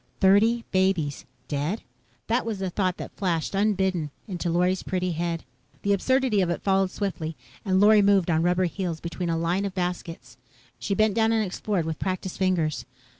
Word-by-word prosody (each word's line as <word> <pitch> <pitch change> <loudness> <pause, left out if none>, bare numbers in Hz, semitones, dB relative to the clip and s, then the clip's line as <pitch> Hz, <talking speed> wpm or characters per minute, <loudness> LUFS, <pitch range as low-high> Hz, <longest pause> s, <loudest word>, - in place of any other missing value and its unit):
Thirty 220 +5 +4
babies 185 -7 +1 0.2
dead? 150 +9 -2 0.4
That 235 +3 +1
was 225 -2 -3
the 190 -1 -3
thought 185 -1 0
that - - -8
flashed, 175 -5 -1
unbidden, 190 -5 +1 0.2
into 180 -3 -3
Lorry's 180 +2 +1
pretty 185 -1 -2
head. 170 0 -2 0.4
The 200 - +3
absurdity 260 0 +2
of 180 - +1
it 170 - -2
followed 195 -1 +2
swiftly, 175 -6 -3 0.3
and 190 -2 +2
Lorry 210 +1 +7
moved 195 -3 +3
on 160 0 +2
rubber 180 +1 +2
soles 175 -2 -3
between 170 +1 -4
a 165 - +1
line 170 +4 0
of 195 -1 -4
baskets. 175 -2 -4 0.4
She 200 - -1
bent 215 0 +3
down 225 +1 +2
and 220 -1 +2
explored 190 -1 -2
with 160 -1 -4
practiced 185 0 -3
fingers. 175 -7 0
185 Hz, 175 wpm, -26 LUFS, 170-200 Hz, 0.4 s, Lorry